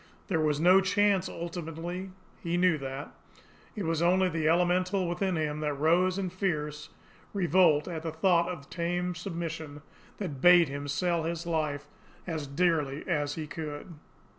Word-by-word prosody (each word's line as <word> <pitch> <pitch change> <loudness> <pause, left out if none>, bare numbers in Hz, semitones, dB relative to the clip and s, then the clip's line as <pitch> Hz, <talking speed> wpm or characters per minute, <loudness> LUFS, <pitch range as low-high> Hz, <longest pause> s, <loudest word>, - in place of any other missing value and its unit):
There 170 -4 +1
was 150 -2 +1
no 180 +4 +6
chance 195 0 +2
ultimately, 170 +2 -5 0.3
he 170 0 -1
knew 180 -3 +3
that; 135 +1 -6 0.6
it 210 - -3
was 165 0 -1
only 185 +2 +3
the 160 -2 0
elemental 180 +2 +2
within 180 +2 -1
him 150 -1 -2
that 150 -1 -1
rose 175 +6 +2
in 190 -2 -2
fierce 150 -6 -3 0.5
revolt 175 -5 +3
at 165 -3 -4
the 160 0 -4
thought 170 +1 +2
of 150 -6 -7
tame 175 +1 -2
submission, 160 -4 -6 0.3
that 150 -10 -5
bade 175 -2 +7
him 145 +1 -5
sell 170 +4 0
his 170 +1 -3
life 155 -4 -2 0.4
as 160 -5 -4
dearly 150 -2 0
as 145 -1 0
he 160 - -4
could. 150 +2 -7
170 Hz, 155 wpm, -29 LUFS, 150-180 Hz, 0.6 s, bade